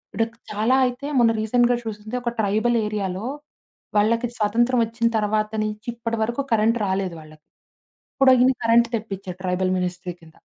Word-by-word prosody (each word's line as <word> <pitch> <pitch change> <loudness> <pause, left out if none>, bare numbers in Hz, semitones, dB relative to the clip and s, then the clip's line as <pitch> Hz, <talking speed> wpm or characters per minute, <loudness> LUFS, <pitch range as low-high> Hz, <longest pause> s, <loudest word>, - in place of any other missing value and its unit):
ఇడ 225 - +2 0.3
చాలా 215 +5 +2
అయితే 250 +3 -3
మొన్న 230 -1 +5
రీసెంట్‌గా 240 +2 +3
చూసింది 215 +1 -6
ఒక 240 -1 -2
ట్రైబల్ 220 +4 +1
ఏరియాలో. 200 -1 -3 0.7
వాళ్ళకి 230 +3 +2
స్వతంత్రం 235 +4 +2
వచ్చిన 230 +1 -1
తర్వాత 215 0 0
నుంచి 215 +2 -5
ఇప్పటి 230 -1 -3
వరకు 235 +5 -1
కరెంట్ 225 +1 +3
రాలేదు 190 -2 -1
వాళ్ళకి. 155 0 -16 0.7
ఇప్పుడు 270 -1 +5
ఈయన 255 +1 +5
కరెంట్ 230 +1 +4
తెప్పించారు. 195 -4 -7
ట్రైబల్ 185 0 0
మినిస్ట్రీ 180 0 -3
కింద. 160 -1 -18
215 Hz, 150 wpm, -23 LUFS, 195-235 Hz, 0.7 s, మొన్న